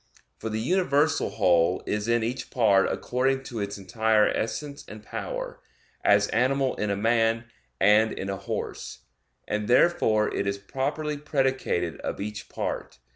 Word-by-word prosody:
For 110 - -4
the 110 0 -2
universal 150 - +2
whole 90 -2 +2
is 105 +1 -2
in 115 -1 +2
each 120 +3 -3
part 100 -6 +3
according 135 +2 0
to 120 -3 -6
its 100 0 -3
entire 110 +2 +2
essence 140 +6 -3
and 105 0 -10
power; - - -5 0.4
as 100 0 +4
animal 130 +3 +1
in 105 - -1
a 100 - +1
man 115 +2 +2 0.3
and 105 +3 +5
in 95 - -5
a 100 - -2
horse; 95 - -5 0.5
and 105 0 -2
therefore 115 -5 +3
it 100 - -1
is 100 0 -1
properly 145 +8 -3
predicated 135 - -1
of - - -4
each 105 +1 -6
part. - - -4
110 Hz, 150 wpm, -26 LUFS, 100-130 Hz, 0.5 s, and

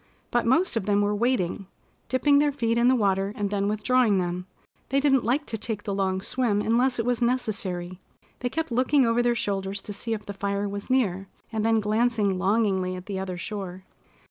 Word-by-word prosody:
But 240 -1 +1
most 320 +8 +3
of 215 -3 -2
them 205 0 +3
were 205 0 +1
waiting, 210 -4 0 0.4
dipping 285 +2 +4
their 295 0 +3
feet 230 -5 0
in 240 - +4
the 260 - +5
water, 195 -3 +1
and 205 -2 -2
then 200 -1 0
withdrawing 215 +1 +2
them. 180 0 -2 0.4
They 275 - +2
didn't 270 -3 +3
like 265 +6 0
to 225 - -5
take 215 -1 -4
the 200 - -3
long 190 -1 0
swim 225 -1 0
unless 245 +4 +2
it 230 - -1
was 245 0 0
necessary. 195 -7 -2 0.4
They 245 - -2
kept 320 +1 -3
looking 260 +3 +3
over 230 +1 +2
their 240 0 +2
shoulders 195 -2 -2
to 205 - -7
see 225 +3 -4
if 210 -1 -9
the 200 - -6
fire 200 +1 -2
was 200 +3 -6
near, 195 -7 +1 0.2
and 220 -2 -1
then 225 0 +3
glancing 215 -2 +1
longingly 190 -2 +1
at 180 0 -8
the 195 -2 -4
other 185 -2 -4
shore. 190 -1 -6
210 Hz, 205 wpm, -26 LUFS, 195-245 Hz, 0.4 s, the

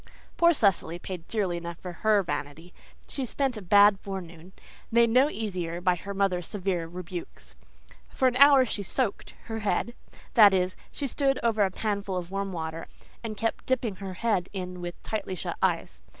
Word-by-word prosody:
Poor 340 0 +5
Cecily 195 - +2
paid 175 -1 -7
dearly 195 -6 -1
enough 170 -1 -6
for 180 - -7
HER 210 +3 +2
vanity. 150 +2 -5 0.3
She 275 - -3
spent 265 +1 -1
a 215 - -6
bad 200 +1 +6
forenoon, 180 -3 -8 0.4
made 235 0 +4
no 260 +5 +5
easier 180 - -3
by 180 0 +3
her 195 +3 -6
mother's 185 -3 0
severe 185 -4 -2
rebukes. 175 0 -8 0.6
For 260 - +1
an 250 - +1
hour 280 -1 +8
she 220 - -3
"soaked" 205 +3 -2
her 225 -1 -5
head; 220 +3 -1 0.4
that 205 -4 +8
is, 185 0 0 0.2
she 285 - -4
stood 275 0 +1
over 225 -3 +3
a 195 - +2
panful 200 -1 -2
of 175 0 -5
warm 195 0 -2
water 160 -1 -5 0.4
and 215 -2 -5
kept 225 +2 -2
dipping 235 -6 0
her 190 -2 -6
head 200 -4 0
in 180 -2 -5
with 175 0 -5
tightly 210 -3 -3
shut - - -4
eyes. 60 -1 0
195 Hz, 180 wpm, -27 LUFS, 175-225 Hz, 0.6 s, hour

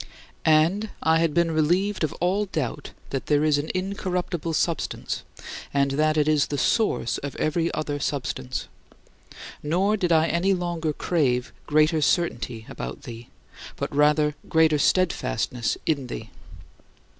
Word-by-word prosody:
" - - -34 0.2
And 205 +5 -4
I 160 0 +4
had 165 -1 +2
been 170 +1 +2
relieved 175 +6 +1
of 155 - +1
all 190 +4 0
doubt 150 -5 -3 0.2
that 135 - -3
there 150 0 +3
is 150 -2 +3
an 145 - -4
incorruptible 180 -3 -2
substance 165 +2 -1 0.5
and 140 0 +3
that 155 +2 +2
it 150 -1 +3
is 155 -2 +3
the 145 - -3
source 210 - +1
of 140 -1 -6
every 165 +2 0
other 145 -1 -2
substance. 130 -2 -3 0.9
Nor 190 +8 +1
did 180 -3 0
I 160 -1 +5
any 180 +4 +2
longer 170 -3 -2
crave 135 -6 0
greater 155 +1 +3
certainty 125 -9 0
about 60 - -7
thee, 115 0 -9 0.5
but - - -4
rather 150 +1 +3 0.2
greater 160 -2 +4
steadfastness 125 - +1
in 140 -5 0
thee. 115 -3 -7
155 Hz, 145 wpm, -25 LUFS, 145-175 Hz, 0.9 s, I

